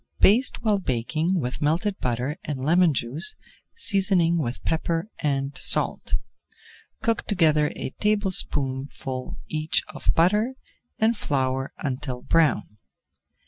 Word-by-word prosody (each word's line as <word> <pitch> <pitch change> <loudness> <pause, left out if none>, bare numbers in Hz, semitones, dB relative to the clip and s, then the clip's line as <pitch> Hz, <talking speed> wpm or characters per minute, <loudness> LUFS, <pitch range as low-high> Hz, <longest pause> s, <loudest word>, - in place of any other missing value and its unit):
Baste 235 +5 +4
while 210 -3 +2
baking 160 +5 -1
with 125 -3 -4
melted 170 +7 0
butter 125 +4 -1
and 135 -3 -4
lemon 170 +2 +4
juice, 140 - +1 0.4
seasoning 190 - +2
with 125 -4 -3
pepper 165 +4 -1
and 140 -1 -1
salt. - - +2 0.9
Cook 230 -3 0
together 155 -6 +3
a - - -4
tablespoonful 140 - -2
each 155 0 0
of 155 - -1
butter 210 +9 +3 0.4
and 225 +2 +3
flour 135 -6 -1
until 130 -2 -4
brown. 145 -10 +1
155 Hz, 110 wpm, -25 LUFS, 135-190 Hz, 0.9 s, Baste